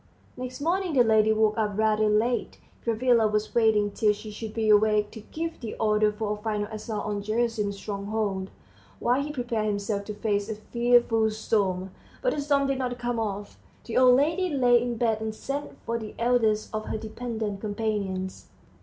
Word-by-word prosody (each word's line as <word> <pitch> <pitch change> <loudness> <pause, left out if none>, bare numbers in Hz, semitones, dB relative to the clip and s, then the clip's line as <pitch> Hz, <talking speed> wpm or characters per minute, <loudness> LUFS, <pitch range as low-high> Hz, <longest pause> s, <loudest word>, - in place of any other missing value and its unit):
Next 255 +1 -6
morning 350 +2 0
the 255 -3 +6
lady 220 -1 +4
woke 220 0 +2
up 210 -2 -1
rather 215 0 +3
late. 225 +4 +1 0.3
Gavrila 230 0 +3
was 210 0 -1
waiting 215 -3 +3
till 210 +1 +2
she 210 +1 -9
should 215 +1 -6
be 220 0 -1
awake, 210 0 +4
to - - -9
give 325 +9 -5
the 230 -4 -6
order 215 -1 +2
for 210 0 -2
a 210 - -8
final 210 -1 -1
assault 215 -1 -4
on 205 -1 -2
Gerasim's 215 -1 -1
stronghold, 200 -1 -3 0.5
while 250 +3 +1
he 295 +1 -3
prepared 240 -6 -2
himself 200 0 -2
to 210 - -6
face 205 -1 -1
a 220 - -2
fearful 235 0 +2
storm. 195 -4 -1 0.3
But - - +2
the 290 - -2
storm 280 -1 +2
did 275 -1 0
not 250 -1 -2
come 240 -1 -2
off. 205 -2 -4 0.3
The 230 - -5
old 250 -1 +7
lady 325 +7 +2
lay 245 -5 +4
in 240 -1 -2
bed 220 -2 +1
and 220 0 -3
sent 280 +5 -5
for 230 0 -1
the 215 -2 -8
eldest 230 -3 +1
of 215 0 -3
her - - -3
dependent 220 -2 -4
companions. 205 -3 -3
220 Hz, 185 wpm, -26 LUFS, 210-245 Hz, 0.5 s, old